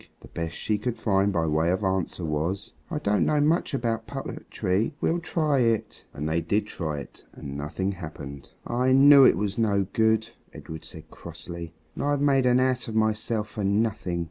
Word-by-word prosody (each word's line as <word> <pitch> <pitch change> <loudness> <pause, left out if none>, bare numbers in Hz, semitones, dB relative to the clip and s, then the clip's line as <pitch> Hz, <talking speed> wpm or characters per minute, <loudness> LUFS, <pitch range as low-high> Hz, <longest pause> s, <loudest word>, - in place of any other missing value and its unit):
the - - -12
best 85 0 -4
she 105 -1 -1
could 120 +2 -3
find 100 -1 +2
by 85 -4 0
way 80 +2 +1
of 95 +3 0
answer 95 -2 -1
was, 80 +6 -2 0.2
"I 170 - -2
don't 105 -8 +1
know 150 - +2
much 155 0 +2
about 115 -3 -2
poetry. 110 -5 -2
We'll 170 - +1
try 155 -4 0
it." 115 -3 0
And 75 +2 -4
they 80 +2 0
did 100 +6 0
try 80 -7 -4
it, - - -13
and 70 -1 -8
nothing 75 +7 -2
happened. 75 -6 -8 0.2
"I 125 +2 +1
knew 140 0 +8
it - - +5
was 100 +2 -2
no 100 -3 +2
good," 110 0 +2 0.2
Edred 80 -1 -9
said 80 0 -11
crossly; 85 0 -9 0.2
"and - - -4
I've 145 0 +1
made 135 -2 +3
an 125 0 +4
ass 130 -1 +1
of 110 - -5
myself 110 0 0
for 105 -1 -5
nothing." 100 -3 0
105 Hz, 190 wpm, -26 LUFS, 85-125 Hz, 0.2 s, knew